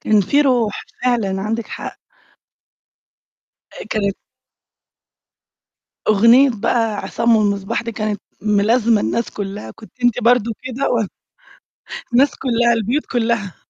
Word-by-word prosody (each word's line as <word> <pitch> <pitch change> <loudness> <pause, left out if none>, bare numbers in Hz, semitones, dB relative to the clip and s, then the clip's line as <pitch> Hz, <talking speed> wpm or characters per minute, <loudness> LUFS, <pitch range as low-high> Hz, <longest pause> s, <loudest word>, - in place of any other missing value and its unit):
كان 215 -1 +3
في 280 +10 +2
روح، 245 -7 +1 0.2
فعلًا 210 -6 0
عندِك 225 +2 -2
حق. - - -7 1.7
آآ، - - -9
كانت 200 -2 -1 1.9
أغنية 230 +6 +6
بقى 225 0 0
عصام 230 +1 +1
والمصباح 200 -1 0
دي 230 0 -5
كانت 215 -1 -3 0.2
ملازمة 215 +2 +2
الناس 235 +2 -1
كلّها 205 0 -6
كنتِ 220 -1 -15
أنتِ 245 -2 +2
برضه 235 -1 +3
كده؟ 260 +2 -2
و 225 -4 +1 1.1
الناس 265 +3 +4
كلّها، 240 -2 +2
البيوت 235 +6 -1
كلّها. 225 -5 -1
230 Hz, 115 wpm, -19 LUFS, 210-240 Hz, 1.9 s, أغنية